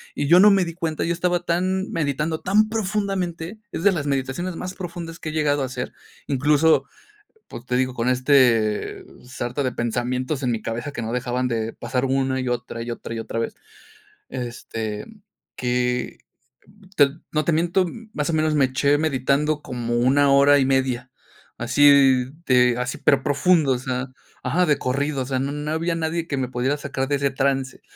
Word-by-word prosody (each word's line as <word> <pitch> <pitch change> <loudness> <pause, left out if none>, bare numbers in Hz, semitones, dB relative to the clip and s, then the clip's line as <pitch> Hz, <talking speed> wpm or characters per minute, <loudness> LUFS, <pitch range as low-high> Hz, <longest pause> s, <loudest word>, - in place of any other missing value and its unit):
Y 145 - -1
yo 175 +4 +7
no 205 +2 +8
me 195 -2 +4
di 170 -1 -5
cuenta, 165 -3 -3
yo 170 - 0
estaba 175 0 0
tan 185 +3 -1
meditando 155 +1 -1
tan 215 +3 +2
profundamente. 195 -3 -2
Es 165 - -4
de 205 - +6
las 155 -6 -2
meditaciones 140 +6 -2
más 180 +2 -5
profundas 170 -2 -7
que 155 - -5
he - - -4
llegado 145 -2 +1
a - - 0
hacer. 130 -1 -5 1.6
Pues, 120 - -10
te 125 - -1
digo, 130 0 0
con 120 +1 -1
este, 125 -5 +2 0.2
sarta 125 +1 -4
de 130 - 0
pensamientos 125 +4 -2
en 125 - +1
mi 115 -2 -2
cabeza 120 +5 -4
que 130 - -5
no 115 +1 -4
dejaban 125 +1 -1
de 115 -1 -2
pasar 125 +2 -3
una 130 0 0
y 130 - -4
otra 120 -1 -4
y 120 +1 -4
otra 115 - -6
y 115 - -4
otra 115 0 -4
vez. 115 - -3 0.7
Este, 115 -4 -5 0.5
que, 125 0 -1 1.1
no 155 -1 0
te - - +2
miento, 175 +3 +2 0.3
más 150 +1 -2
o - - -4
menos 155 0 +1
me 140 -3 +4
eché 140 +3 +2
meditando 150 +1 0
como 120 -4 -3
una 140 +4 +3
hora 140 +1 +6
y 135 - +2
media. 130 -2 0 0.5
Así 145 0 +4 0.6
de, 125 -1 +4 0.3
pero 135 -2 +4
profundo, 145 -1 +3
o 125 - -2
sea, 130 0 -3 0.4
ajá, 180 +1 +2
de 150 -4 +2
corrido, 140 +2 -1
o - - -2
sea, 130 0 -1
no 150 +3 -3
había 165 +1 -1
nadie 165 +1 -2
que 140 - -2
me 130 -1 -2
pudiera 130 +3 0
sacar 140 -2 -3
de 145 - +1
ese 140 0 0
trance, 135 0 -1
140 Hz, 180 wpm, -23 LUFS, 125-160 Hz, 1.6 s, no